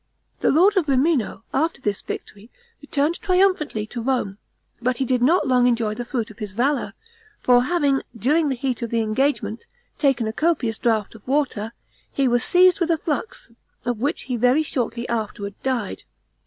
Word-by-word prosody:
The - - +2
lord 380 +7 +4
of 340 -5 +2
Rimino, 270 -4 +1
after 320 +4 0
this 205 -6 -2
victory, 210 +3 -8 0.3
returned 290 +3 -1
triumphantly 365 - +2
to 235 +2 -6
Rome, 225 -6 -1 0.4
but 250 +1 +1
did 255 -1 0
not 325 +9 +3
long 250 -1 +4
enjoy 230 -3 +1
the 240 +2 -5
fruit 235 -4 -3
of 215 - -17
his 210 -3 -5
valor; 270 +6 0 0.5
for 245 0 +4
having, 285 -4 +2 0.2
during 295 +7 +2
the 265 - 0
heat 255 -1 -2
of 235 - -3
the 230 0 +1
engagement, 225 -1 -1 0.3
taken 270 -6 +2
a 220 - -3
copious 275 -8 0
draught 220 -3 0
of 225 0 -16
water, 250 -6 -1 0.4
he 275 -1 +1
was 240 0 +2
seized 365 +1 +5
with 340 -2 0
a 330 - +3
flux, 285 -7 -4 0.3
of 245 -3 -1
which 285 +6 -1
he 250 -2 -3
very 250 +6 +3
shortly 245 -4 -2
afterward 210 -3 -3
died. 250 -6 -2
250 Hz, 175 wpm, -22 LUFS, 225-295 Hz, 0.5 s, seized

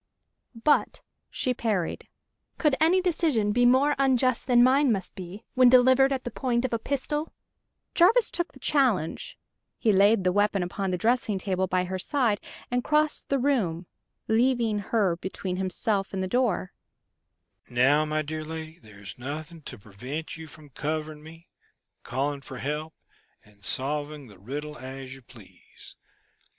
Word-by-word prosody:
"But," 300 - +2 0.3
she 255 - -1
parried, 210 -8 -2 0.5
"could 300 -4 +2
any 350 +4 +4
decision 310 - +1
be 245 +3 +4
more 270 +4 +4
unjust 255 -2 +2
than 245 -2 +5
mine 265 +1 +4
must 190 -4 -3
be, 185 +2 -9
when 255 -1 +6
delivered 260 +2 +5
at 265 -2 -2
the 245 - -5
point 245 0 -1
of 255 - -3
a 230 - 0
pistol?" 295 +5 -3 0.6
Jarvis 430 +8 +4
took 345 0 -2
the - - -16
challenge. 245 - 0 0.4
He 225 - +2
laid 200 +1 +4
the 180 - +2
weapon 205 -1 +1
upon 190 +2 -3
the 180 - -1
dressing 225 0 +1
table 190 -1 -1
by 185 0 +1
her 185 +1 -4
side 230 -1 0 0.3
and 245 0 0
crossed 300 0 +1
the 275 - +2
room, 220 -11 0 0.4
leaving 230 -2 +2
her 200 -4 0
between 185 0 -5
himself 195 +2 -1
and 190 -1 -2
the - - -2
door. 215 -4 0 1.0
"Now, 135 +5 +3
my 155 0 -1
dear 155 +1 -5
lady, 160 +1 -7
there's 105 -2 -12
nothing 155 +5 -6
to 125 - -9
prevent 125 +10 -7
you 160 -1 -9
from 150 -1 -14
covering 155 +2 -4
me, 165 +2 -14 0.5
calling 140 +3 -2
for 135 -1 -9
help, 150 +4 -4 0.5
and 105 -1 -22
solving 145 +4 -2
the 100 -3 -16
riddle 145 +8 -6
as 130 0 -8
you 135 - -12
please. 120 - -16
190 Hz, 155 wpm, -26 LUFS, 155-250 Hz, 1.0 s, when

